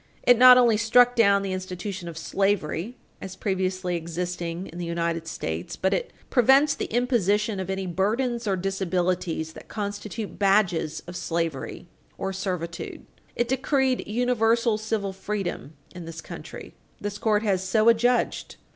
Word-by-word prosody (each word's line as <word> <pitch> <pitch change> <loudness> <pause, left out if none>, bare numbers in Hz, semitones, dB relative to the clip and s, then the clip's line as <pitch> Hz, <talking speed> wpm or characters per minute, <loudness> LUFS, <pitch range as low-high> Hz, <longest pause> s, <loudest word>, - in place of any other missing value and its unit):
It 245 - +6
not 250 0 +10
only 235 -3 +5
struck 245 +3 +4
down 200 -3 +4
the 195 -1 -2
institution 185 0 -5
of 165 - -9
slavery 195 +4 -1 0.2
as 190 -1 -7
previously 185 -2 -1
existing 170 +1 -4
in 175 - -9
the 175 - -3
United 170 -1 -2
States, 80 - -4
but 190 - 0
it - - -2 0.2
prevents 270 +4 +5
the - - -3
imposition 215 -4 +1
of 190 0 -4
any 190 0 -2
burdens 230 +6 -1
or 195 - +2
disabilities 180 -3 -1
that - - -12
constitute 205 +1 -5
badges 195 -6 +2
of 175 - -9
slavery 165 -3 -3 0.3
or 195 - -3
servitude. 180 -3 -5 0.3
It 240 - 0
decreed 265 0 0
universal 230 0 +2
civil 215 -3 -2
freedom 190 -6 -4 0.2
in 180 -2 -8
this 165 0 -8
country. - - -9 0.3
This 205 0 -5
court 215 -1 +2
has 190 -3 +1
so 215 +4 +2
adjudged. 240 +2 +2
195 Hz, 145 wpm, -25 LUFS, 180-225 Hz, 0.3 s, not